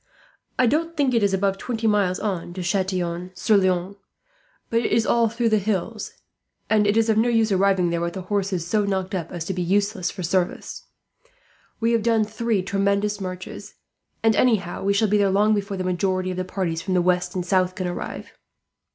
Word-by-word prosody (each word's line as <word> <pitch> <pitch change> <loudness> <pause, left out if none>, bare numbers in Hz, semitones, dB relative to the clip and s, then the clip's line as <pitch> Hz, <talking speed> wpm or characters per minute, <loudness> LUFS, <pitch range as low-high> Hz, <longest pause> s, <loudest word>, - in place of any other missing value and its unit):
"I 255 - +4
don't 325 +6 0
think 275 -3 +2
it 230 - +3
is 200 -1 +2
above 195 0 0
twenty 230 0 -4
miles 200 -4 +2
on 185 -4 -3
to 185 - -4
Chatillon 180 -1 -1
sur 210 +4 +2
Loing; 185 0 +1 0.7
but 230 - +3
it - - -2
is 225 -1 +3
all 235 -1 +3
through 230 +1 0
the 215 -1 +3
hills, 210 +2 -3 0.6
and 210 -1 +4
it 205 +2 +2
is 225 0 +3
of 220 -1 +2
no 235 +2 +3
use 225 -2 +2
arriving 190 -2 +2
there 170 0 -1
with 170 0 -2
the 190 - -5
horses 190 -3 -1
so 210 +4 +1
knocked 190 -1 -2
up 170 -4 -3
as 170 -3 -5
to 190 - -2
be 180 - -3
useless 200 +1 0
for 185 - -7
service. 180 +1 -2 0.9
We 230 +1 +1
have 230 -1 +2
done 225 0 +2
three 220 -2 -1
tremendous 200 +1 0
marches, 185 -1 -7 0.5
and 225 -1 +4
anyhow, 210 -8 +1
we 200 +1 +2
shall 215 +2 +2
be 210 +1 +2
there 200 -1 +3
long 205 +3 +3
before 200 -1 -2
the 185 - -2
majority 185 0 0
of 180 - -5
the 185 - -2
parties 180 -3 -2
from 185 0 -2
the 180 - +4
west 180 0 +1
and 180 -1 -2
south 185 0 +1
can 185 - -3
arrive. 175 0 -5
195 Hz, 210 wpm, -23 LUFS, 185-215 Hz, 0.9 s, I